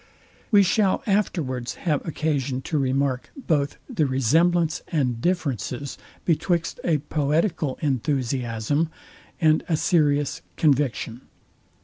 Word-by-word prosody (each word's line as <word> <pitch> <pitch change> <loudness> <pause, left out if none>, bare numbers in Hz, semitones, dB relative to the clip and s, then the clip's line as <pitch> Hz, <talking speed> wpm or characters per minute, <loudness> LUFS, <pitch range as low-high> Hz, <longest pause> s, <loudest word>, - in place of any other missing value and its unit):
We 205 -4 +6
shall 195 +1 +2
afterwards 140 - -1
have 150 -5 -1
occasion 140 -5 -1
to 155 - -1
remark 135 -1 0
both 150 - 0
the 180 - 0
resemblance 160 +6 +2
and 125 -7 0
differences 140 - -2 0.3
betwixt 170 0 0
a 165 -3 +2
poetical 150 +1 0
enthusiasm, 130 0 0 0.5
and 155 -2 +4
a 160 - +2
serious 145 -2 +2 0.2
conviction. 130 -5 +1
145 Hz, 100 wpm, -24 LUFS, 130-165 Hz, 0.5 s, We